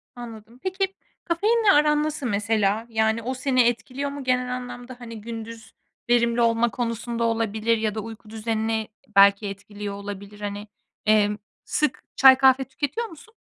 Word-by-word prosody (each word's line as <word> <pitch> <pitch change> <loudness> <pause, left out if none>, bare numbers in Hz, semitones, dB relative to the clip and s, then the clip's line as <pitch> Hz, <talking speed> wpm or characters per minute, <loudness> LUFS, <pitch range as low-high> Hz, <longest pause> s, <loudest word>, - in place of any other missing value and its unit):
Anladım. 230 0 -10
Peki, 385 +1 -1 0.3
kafeinle 420 +5 +3
aran 300 -2 +4
nasıl 305 -3 -3
mesela? 210 0 +1
Yani, 220 0 +1
o 255 - -2
seni 260 -1 +2
etkiliyor 255 +5 -2
mu 280 -1 -7
genel 250 0 0
anlamda, 250 0 -8
hani, 230 -2 -9
gündüz 225 0 -8 0.4
verimli 235 0 +3
olma 230 0 +3
konusunda 235 +1 -3
olabilir 225 0 +1
ya 220 -1 -1
da 220 - -2
uyku 220 0 -10
düzenini 220 0 -2 0.3
belki 200 +1 +6
etkiliyor 205 +1 -7
olabilir, 200 +1 -8
hani, 205 +1 -5 0.4
emm, 210 -1 +3 0.3
sık 300 - -1
çay, 265 0 +8
kahve 265 0 +5
tüketiyor 290 - -3
musun? 440 +5 -15
230 Hz, 145 wpm, -24 LUFS, 215-260 Hz, 0.4 s, çay